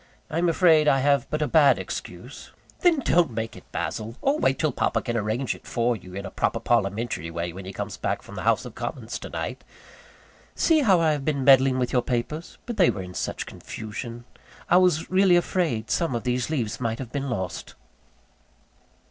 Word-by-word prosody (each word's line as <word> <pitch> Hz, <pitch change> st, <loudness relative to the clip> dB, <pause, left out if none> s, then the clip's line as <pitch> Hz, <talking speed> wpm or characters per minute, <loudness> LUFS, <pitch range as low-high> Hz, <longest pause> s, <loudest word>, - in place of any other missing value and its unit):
I 160 Hz, -, 0 dB
am 175 Hz, 0 st, +2 dB
afraid 160 Hz, -3 st, +4 dB
I 135 Hz, -2 st, +4 dB
have 140 Hz, -2 st, +2 dB
but 155 Hz, 0 st, -1 dB
a -, -, 0 dB
bad 145 Hz, -3 st, +5 dB
excuse -, -, -7 dB, 0.2 s
" -, -, -28 dB
"Then 335 Hz, -5 st, +4 dB
don't 175 Hz, -, +3 dB
make 115 Hz, -1 st, -4 dB
it, -, -, -15 dB
Basil; 110 Hz, +2 st, -4 dB
or 285 Hz, +3 st, +1 dB
wait 135 Hz, -, +2 dB
till 155 Hz, -2 st, +1 dB
papa -, -, 0 dB
can 120 Hz, -, -3 dB
arrange 115 Hz, +4 st, -1 dB
it -, -, -15 dB
for 120 Hz, 0 st, +1 dB
you, 90 Hz, -3 st, -11 dB
in 100 Hz, +1 st, -5 dB
a 95 Hz, -, -7 dB
proper -, -, 0 dB
parliamentary 105 Hz, -6 st, 0 dB
way, 85 Hz, +1 st, -4 dB
when 95 Hz, +1 st, -9 dB
he 95 Hz, -, -6 dB
comes 105 Hz, +1 st, -5 dB
back -, -, -2 dB
from -, -, -12 dB
the -, -, -5 dB
House -, -, +2 dB
of -, -, -8 dB
Commons -, -, -5 dB
to -, -, -8 dB
night. -, -, -5 dB, 0.9 s
See 325 Hz, -2 st, +3 dB
how 200 Hz, -, +4 dB
I 160 Hz, -2 st, +3 dB
have 145 Hz, -2 st, -2 dB
been 140 Hz, -2 st, -1 dB
meddling 135 Hz, -1 st, +6 dB
with 125 Hz, -1 st, -1 dB
your 125 Hz, -, +3 dB
papers; 130 Hz, +8 st, -3 dB
but 235 Hz, -2 st, -5 dB
they 185 Hz, -, +5 dB
were 95 Hz, -, -3 dB
in 90 Hz, 0 st, -9 dB
such -, -, -3 dB
confusion 115 Hz, +2 st, -7 dB, 0.5 s
I 175 Hz, -, +7 dB
was 180 Hz, -4 st, +2 dB
really 185 Hz, -1 st, +5 dB
afraid 165 Hz, -, 0 dB
some 165 Hz, -7 st, 0 dB
of 115 Hz, -, -3 dB
these 125 Hz, +1 st, -1 dB
leaves 120 Hz, -9 st, -2 dB
might 115 Hz, -2 st, -1 dB
have 125 Hz, -2 st, -7 dB
been 140 Hz, -1 st, -3 dB
lost." 95 Hz, -7 st, -4 dB
130 Hz, 210 wpm, -25 LUFS, 115-160 Hz, 0.9 s, I